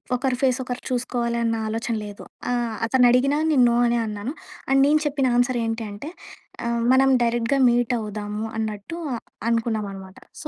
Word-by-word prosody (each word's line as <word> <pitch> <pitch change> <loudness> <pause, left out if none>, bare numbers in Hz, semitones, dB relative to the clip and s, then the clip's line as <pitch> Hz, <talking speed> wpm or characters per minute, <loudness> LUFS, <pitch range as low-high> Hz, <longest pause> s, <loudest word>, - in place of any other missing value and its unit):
ఒకరి 255 0 0
ఫేస్ 260 -1 +2
ఒకరు 250 -1 -5
చూసుకోవాలి 240 -1 -1
అన్న 230 0 +1
ఆలోచన 225 +1 -2
లేదు. 205 -1 -9 0.3
ఆహ్, 240 -2 -1
అతను 250 +1 +4
అడిగినా 275 +4 +3
నేను 270 -5 +4
నో 235 - +2
అనే 240 0 +1
అన్నాను. 210 +6 -4 0.4
అండ్ 270 0 +4
నేను 305 +1 +4
చెప్పిన 275 -3 +1
ఆన్సర్ 245 0 +2
ఏంటి 225 0 -3
అంటే 215 +10 -7 0.6
ఆహ్, 235 0 0
మనం 270 +1 +5
డైరెక్ట్‌గా 235 +3 +1
మీట్ 240 +1 +1
అవుదాము 210 0 -4
అన్నట్టు 215 +8 -4 0.5
అనుకున్నాం 225 -3 0
అనమాట. 190 0 -11 0.2
సో 300 - -6
235 Hz, 165 wpm, -23 LUFS, 220-260 Hz, 0.6 s, మనం